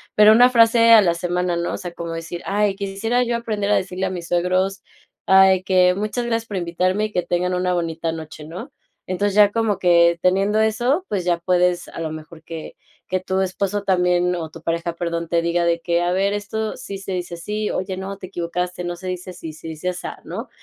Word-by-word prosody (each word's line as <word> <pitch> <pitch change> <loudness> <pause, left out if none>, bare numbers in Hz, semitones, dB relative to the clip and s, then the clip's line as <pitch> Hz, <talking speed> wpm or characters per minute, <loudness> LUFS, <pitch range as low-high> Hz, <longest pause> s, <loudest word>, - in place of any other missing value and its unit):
pero 210 0 +8
una 245 +3 +7
frase 230 -1 +5
a 225 -2 +9
la 175 -4 +2
semana, 175 +1 -1
¿no? 170 0 -2
O - - -3
sea, 175 - -6
como 170 -1 -6
decir: 165 +1 -6
"Ay, 205 0 +1
quisiera 200 +5 -1
yo 240 -1 -1
aprender 210 -3 -2
a 210 - +4
decirle 185 -1 -2
a - - -2
mis 175 -2 -6
suegros, 185 +2 0 0.4
ay, 190 -1 +5
que 185 -1 +4
muchas 215 +5 -2
gracias 230 -1 -1
por 200 - -4
invitarme, 185 +4 0
y 215 - -5
que 180 - 0
tengan 180 +1 -1
una 180 0 0
bonita 165 -1 -2
noche", 155 -1 -8
¿no?, 165 +4 -8 0.4
entonces, 200 +2 -1
ya 205 -1 +6
como 225 -3 0
que 170 -2 +4
teniendo 195 +4 +2
eso, 240 - +1
pues, 190 -4 -2
ya 175 -1 +2
puedes, 180 0 +1
a - - -9
lo 160 -1 -3
mejor 155 +1 -10
que 165 -2 -8 0.3
que 185 - 0
tu 190 +1 -1
esposo 195 +2 -2
también, 180 -1 +2
o 160 -2 -5
tu 165 0 -13
pareja, 170 0 -2
perdón, 170 -1 -3
te 170 -1 +1
diga 170 +1 +1
de 170 0 +1
que: 170 0 0
"A 175 0 0
ver, 195 +2 +1
esto 215 +1 -3
sí 200 -6 -7
se 195 0 -7
dice 175 -1 -4
así. 210 +5 -3
Oye 185 0 -3
no, 195 +1 -5
te 190 - -9
equivocaste, 180 0 -3
no 175 0 -3
se 180 +2 -12
dice 180 0 -5
así, 165 -3 -8
se 160 - -11
dice 160 +3 -4
asá", 180 - -6
¿no?, - - -7
185 Hz, 225 wpm, -21 LUFS, 170-205 Hz, 0.4 s, a